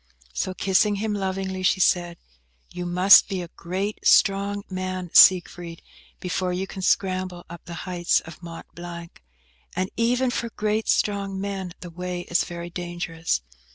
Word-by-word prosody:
So, 185 - -2
kissing 195 +3 +2
him 210 +1 -2
lovingly, 190 -1 -3
she 185 +1 +2
said, 175 -1 +2 0.5
"You 180 0 -5
must 180 +3 +7
be 190 -3 -2
a 170 - -9
great 190 +6 -4
strong 200 0 +3
man, 185 -1 -4
Siegfried, 175 -2 +5 0.4
before 180 0 -2
you 180 +2 -2
can 190 - -8
scramble 185 -2 0
up 170 - -10
the 170 0 -7
heights 175 -1 +1
of 160 0 -12
Mont 170 -1 -9
Blanc; 170 - -9 0.5
and 185 +1 -2
even 245 +2 +2
for 235 -1 -2
great 215 0 -1
strong 200 -2 0
men 195 -3 -4
the 175 - -8
way 180 +1 -4
is 175 0 0
very 175 0 -7
dangerous. 175 - -3
185 Hz, 155 wpm, -24 LUFS, 175-195 Hz, 0.5 s, must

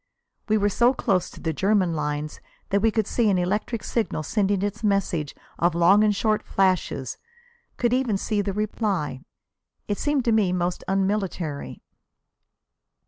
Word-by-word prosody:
We 215 - +4
were 205 -1 +2
so 240 +6 +3
close 185 -6 0
to - - -13
the 160 -1 -2
German 190 0 +2
lines 150 0 -3 0.3
that 200 0 +2
we 225 - +4
could 220 -1 0
see 230 0 +1
an 195 - +2
electric 210 +5 -1
signal 220 -9 -2
sending 200 +2 0
its 205 +3 -3
message 190 -7 0 0.2
of 170 0 +2
long 185 +5 +5
and 210 -1 +3
short 215 +1 +1
flashes, 185 -8 0 0.6
could 240 0 +1
even 250 -5 +1
see 205 +1 -1
the 200 0 -2
reply. 195 - -2 0.7
It 205 - -2
seemed 290 -3 0
to 235 - +3
me 210 -5 +3
most 175 0 -1
unmilitary. 190 -6 -2
200 Hz, 155 wpm, -24 LUFS, 175-215 Hz, 0.7 s, long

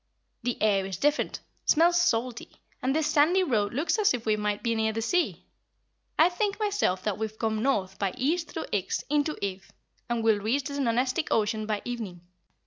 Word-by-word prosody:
"The 245 0 -2
air's 195 -3 +1
different, 295 - 0 0.2
smells 345 +2 +4
salty, 240 -7 0 0.3
and 265 +2 0
this 315 -1 +2
sandy 315 +5 +4
road 215 - +1
looks 310 - 0
as 420 -1 +4
if 235 - -7
we 215 -1 +3
might 210 -1 -2
be 230 - +1
near 220 -1 +1
the 220 - -3
sea. 355 +9 0 0.7
I 320 - +7
think 400 +4 -1
myself 405 - 0
that 210 -2 -2
we've 220 0 -4
come 220 -1 -1
north 195 -8 0
by 195 -2 -1
east 320 +6 0
through 320 - -5
Ix 195 -2 -1
into 300 +1 +1
Ev 190 -1 -4 0.4
and 235 -1 0
will 220 -2 +4
reach 235 +7 0
the 285 0 -4
Nonestic 255 +4 +1
Ocean 215 0 +1
by 210 -2 -2
evening." 220 -8 -5
235 Hz, 185 wpm, -27 LUFS, 210-305 Hz, 0.7 s, I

